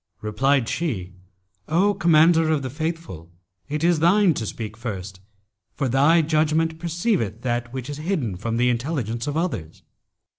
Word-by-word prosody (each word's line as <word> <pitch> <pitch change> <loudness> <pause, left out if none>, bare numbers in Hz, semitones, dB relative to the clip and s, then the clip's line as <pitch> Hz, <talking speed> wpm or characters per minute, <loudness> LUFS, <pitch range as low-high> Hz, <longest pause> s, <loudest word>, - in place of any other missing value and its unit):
Replied 130 +4 +1
she, 105 - -3 0.5
'O 190 +6 +3
Commander 165 -3 +4
of 155 -3 +1
the 130 - -4
Faithful, 155 - -5 0.4
it 150 +2 -2
is 170 -2 +3
thine 180 +2 +4
to 115 -6 -4
speak 110 0 -6
first, 100 -5 -6 0.6
for 140 - -1
thy 145 +7 +4
judgment 160 +1 +1
perceiveth 170 - -1
that 120 -1 -2
which 130 -1 -5
is 145 -1 -5
hidden 150 - -2
from 115 +5 -3
the 125 +1 +3
intelligence 120 -1 -3
of 145 +1 -2
others.' 125 - -3
145 Hz, 150 wpm, -23 LUFS, 115-165 Hz, 0.6 s, Commander